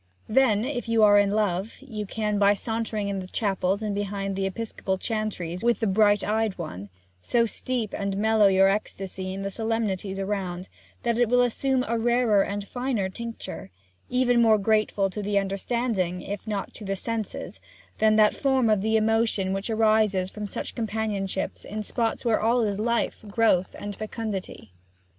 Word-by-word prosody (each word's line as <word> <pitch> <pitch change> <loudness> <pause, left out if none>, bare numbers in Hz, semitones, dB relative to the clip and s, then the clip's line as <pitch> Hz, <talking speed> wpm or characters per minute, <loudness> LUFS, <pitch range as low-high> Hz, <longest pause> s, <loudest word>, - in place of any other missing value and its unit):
Then, 220 -3 +3
if 250 -4 -3
you 225 -1 +4
are 205 -1 +7
in 205 -1 +3
love, 205 0 0
you 220 -7 -6
can, 210 0 -1
by 200 0 +5
sauntering 220 -1 -2
in 200 -1 -2
the 185 - -6
chapels 195 0 0
and 210 -1 -1
behind 200 -1 -3
the 195 0 0
episcopal 195 -2 -3
chantries 195 -5 -3
with 235 0 +2
the 225 - 0
bright 205 0 +3
eyed 215 -1 0
one, 105 - -6 0.3
so 235 - +2
steep 230 -1 -3
and 200 -1 -2
mellow 220 0 +4
your 195 0 +5
ecstasy 195 -2 -3
in 195 +1 -5
the 195 - -3
solemnities 210 -3 -2
around, 190 -2 -3 0.3
that 235 -1 0
it 240 -2 +3
will 245 +1 +4
assume 255 +2 0
a 230 +1 0
rarer 235 -3 +3
and 200 +1 -3
finer 245 -6 -1
tincture, 230 - -7 0.4
even 245 -1 +3
more 220 -2 +5
grateful 210 -1 +1
to 210 - -4
the 205 0 0
understanding, 195 -2 -1
if 205 +2 -6
not 205 -2 -3
to - - -10
the 195 -1 -2
senses, 225 +1 -4 0.4
than 215 0 +4
that 215 -1 +5
form 265 -5 +2
of 210 -3 +2
the 220 +2 +2
emotion 220 -3 +1
which 195 +3 -3
arises 215 -4 +2
from 210 -1 -5
such - - -4
companionship 210 -4 -2
in 215 +1 -5
spots 230 +2 -1
where 230 -2 +2
all 235 +3 +3
is 205 -3 -1
life, 235 +2 0
and 205 -2 -12
growth, 210 -5 +2
and 205 0 -6
fecundity. 210 - -5
210 Hz, 175 wpm, -26 LUFS, 195-225 Hz, 0.4 s, are